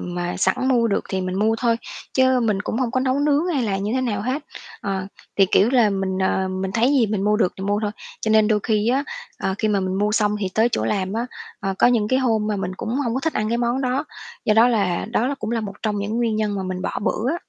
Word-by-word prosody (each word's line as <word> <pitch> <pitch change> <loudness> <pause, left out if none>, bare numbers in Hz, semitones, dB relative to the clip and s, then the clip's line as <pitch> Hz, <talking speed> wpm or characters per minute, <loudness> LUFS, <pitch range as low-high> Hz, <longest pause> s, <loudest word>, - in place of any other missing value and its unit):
mà 175 0 -3
sẵn - - +2
mua 240 -3 +3
được 200 - 0
thì 190 - -1
mình 185 0 -3
mua 220 +2 +2
thôi, 235 -2 +2 0.4
chứ 260 -1 +4
mình 210 -3 0
cũng 225 - -3
hông 250 -3 0
có 255 - 0
nấu 260 +1 +1
nướng 295 +3 +2
hay 290 -8 0
là 200 -4 0
như 200 +3 -2
thế 260 - +1
nào 215 -6 -1
hết. 260 +6 -2 0.4
Ờ, 190 -1 -3 0.3
thì, 195 -1 +5
kiểu 210 +5 +4
là, 240 -5 +4
mình, 190 -1 -1
ờ, 190 0 +1
mình 190 0 -3
thấy 235 +5 +3
gì 260 -6 +4
mình 205 -1 -1
mua 210 0 +3
được 185 -5 +2
thì 190 - -5
mua 205 +1 0
thôi. 210 - 0 0.3
Cho 220 - -1
nên 215 -1 +5
đôi 215 -2 +2
khi 215 0 +1
á, 270 +3 +2 0.3
ờ, 190 - -1
khi 215 - +1
mà 200 -2 +2
mình 185 0 -2
mua 210 +1 +1
xong 210 -1 +2
thì 195 - 0
tới 225 +2 +4
chỗ - - 0
làm 195 -2 -1
á, 230 +2 -1 0.3
ờ, 195 -1 -2
có - - +6
những 225 -4 +2
cái 260 - +3
hôm 225 -5 +1
mà 210 -1 -1
mình 185 -1 -3
cũng - - -5
hông 245 -5 -1
có 265 - -1
thích 320 +2 -1
ăn 215 0 -1
cái 235 +1 0
món 240 +2 0
đó. 260 +3 0 0.4
Do 215 - +3
đó 230 +3 +6
là 200 -7 0
đó 235 0 +1
là 280 - -1
cũng 220 -4 -5
là 235 -1 0
một 200 -2 -6
trong 210 -2 0
những 205 +3 -2
nguyên 230 -2 +1
nhân 210 -1 0
mà 190 - -2
mình 185 0 -4
bỏ - - -2
bữa 235 +6 0
á. 340 - -2
215 Hz, 290 wpm, -22 LUFS, 195-245 Hz, 0.4 s, có